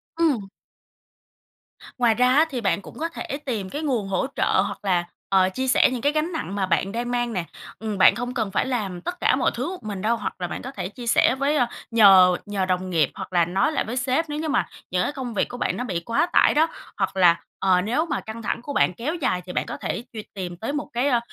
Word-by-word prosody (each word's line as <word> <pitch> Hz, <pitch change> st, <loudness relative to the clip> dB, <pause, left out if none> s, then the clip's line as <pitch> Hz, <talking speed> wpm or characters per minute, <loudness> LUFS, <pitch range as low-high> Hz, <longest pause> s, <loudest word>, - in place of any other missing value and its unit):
Ừm. 295 Hz, -12 st, +1 dB, 1.5 s
Ngoài 240 Hz, -2 st, +4 dB
ra 250 Hz, +2 st, +4 dB
á 310 Hz, +3 st, +6 dB
thì 255 Hz, -5 st, -3 dB
bạn 200 Hz, -1 st, +1 dB
cũng -, -, -12 dB
có 330 Hz, +2 st, -1 dB
thể 280 Hz, -4 st, -5 dB
tìm 215 Hz, -8 st, -3 dB
cái 290 Hz, -, -4 dB
nguồn 250 Hz, -10 st, -1 dB
hỗ 195 Hz, +6 st, 0 dB
trợ -, -, +2 dB
hoặc -, -, -5 dB
là, 180 Hz, -3 st, +2 dB, 0.3 s
ờ, 190 Hz, -1 st, +4 dB
chia 260 Hz, +8 st, -3 dB
sẻ 255 Hz, -, +5 dB
những 250 Hz, -2 st, -3 dB
cái 285 Hz, -, +2 dB
gánh 310 Hz, +3 st, -1 dB
nặng 315 Hz, -, -4 dB
mà 195 Hz, -2 st, 0 dB
bạn 185 Hz, +2 st, 0 dB
đang 240 Hz, +3 st, -3 dB
mang 240 Hz, -1 st, -1 dB
nè. 180 Hz, -4 st, -2 dB, 0.3 s
Ừm, 215 Hz, -2 st, -3 dB
bạn 190 Hz, -, +6 dB
không 245 Hz, 0 st, -4 dB
cần 220 Hz, -6 st, -2 dB
phải -, -, +1 dB
làm 205 Hz, -9 st, -3 dB
tất 355 Hz, -, -5 dB
cả -, -, +3 dB
mọi -, -, +1 dB
thứ 255 Hz, +7 st, -2 dB
một 370 Hz, -, -8 dB
mình 205 Hz, -3 st, -5 dB
đâu, 225 Hz, +3 st, +2 dB
hoặc 210 Hz, -, -4 dB
là 175 Hz, -, -1 dB
bạn -, -, -5 dB
có 265 Hz, -, -6 dB
thể 185 Hz, -8 st, -5 dB
chia 240 Hz, +3 st, -9 dB
sẻ 245 Hz, -, +4 dB
với 280 Hz, +3 st, +1 dB
ờ, 255 Hz, -5 st, +3 dB, 0.3 s
nhờ 190 Hz, -5 st, +7 dB
nhờ 200 Hz, -2 st, -1 dB
đồng 185 Hz, 0 st, -1 dB
nghiệp 160 Hz, -6 st, +2 dB
hoặc -, -, -7 dB
là 175 Hz, -2 st, +4 dB
nói 190 Hz, -, +1 dB
lại 310 Hz, -, 0 dB
với 240 Hz, +4 st, -4 dB
sếp, 260 Hz, +6 st, 0 dB
nếu 295 Hz, 0 st, -3 dB
như 315 Hz, 0 st, -2 dB
mà 295 Hz, -, +1 dB, 0.2 s
những 180 Hz, 0 st, +1 dB
cái -, -, -1 dB
công 260 Hz, -5 st, -5 dB
việc 205 Hz, -, 0 dB
của 245 Hz, -, -7 dB
bạn 185 Hz, -, -1 dB
nó 245 Hz, -, -2 dB
bị 190 Hz, -9 st, -2 dB
quá 230 Hz, -, +1 dB
tải -, -, +5 dB
đó. 315 Hz, +2 st, +4 dB, 0.3 s
Hoặc -, -, -1 dB
là, 175 Hz, -2 st, +5 dB, 0.2 s
ờ, 185 Hz, -2 st, +3 dB
nếu 245 Hz, -, 0 dB
mà 295 Hz, -, -2 dB
căng 220 Hz, +1 st, -8 dB
thẳng 215 Hz, -, -2 dB
của 285 Hz, +4 st, -6 dB
bạn 185 Hz, -, +3 dB
kéo 260 Hz, -, -3 dB
dài 255 Hz, -, 0 dB
thì 180 Hz, -, -7 dB
bạn -, -, -1 dB
có -, -, -6 dB
thể 235 Hz, -, -3 dB
truy 215 Hz, -2 st, -6 dB
tìm 180 Hz, -3 st, -5 dB
tới 225 Hz, +9 st, -4 dB
một 295 Hz, -, -3 dB
cái, 245 Hz, +4 st, +1 dB
ờ, 245 Hz, -4 st, +3 dB
230 Hz, 265 wpm, -24 LUFS, 190-265 Hz, 1.5 s, nhờ